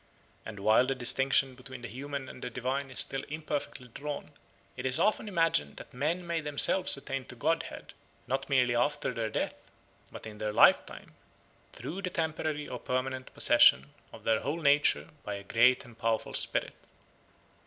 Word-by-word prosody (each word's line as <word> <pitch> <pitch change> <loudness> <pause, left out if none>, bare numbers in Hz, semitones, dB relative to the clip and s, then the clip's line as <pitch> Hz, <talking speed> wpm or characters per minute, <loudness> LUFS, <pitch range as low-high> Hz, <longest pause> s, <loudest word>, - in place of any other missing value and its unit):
And 105 -2 -8
while 110 +5 +4
the 135 - 0
distinction 130 +1 +3
between 130 0 -10
the - - -4
human 140 +3 -6
and 125 - -11
the - - -3
divine 130 +3 -3
is 130 - -3
still 135 0 -2
imperfectly 150 -4 -5
drawn, 145 +5 -6 0.4
it - - -6
is 130 0 +1
often 215 +1 +1
imagined 165 - +1
that - - -11
men 160 +8 -2
may 170 -1 -2
themselves 150 +4 +4
attain 135 -1 -5
to - - -10
godhead, 165 +7 -2 0.3
not 135 +4 -3
merely 125 -3 +3
after 125 +1 0
their 115 -2 -2
death, - - -3 0.5
but - - -10
in 105 -1 -9
their 105 -1 -2
lifetime, - - +3 0.6
through 185 +6 -7
the 185 - -3
temporary 155 -3 -2
or 125 - -6
permanent 130 0 -3
possession 70 +2 +5 0.2
of - - -13
their 110 -1 +2
whole 150 +5 -3
nature 145 0 +3
by 105 - -5
a 100 - -8
great 120 +5 +3
and 120 -2 -16
powerful 115 -1 -1
spirit. - - -1
130 Hz, 170 wpm, -30 LUFS, 120-150 Hz, 0.6 s, possession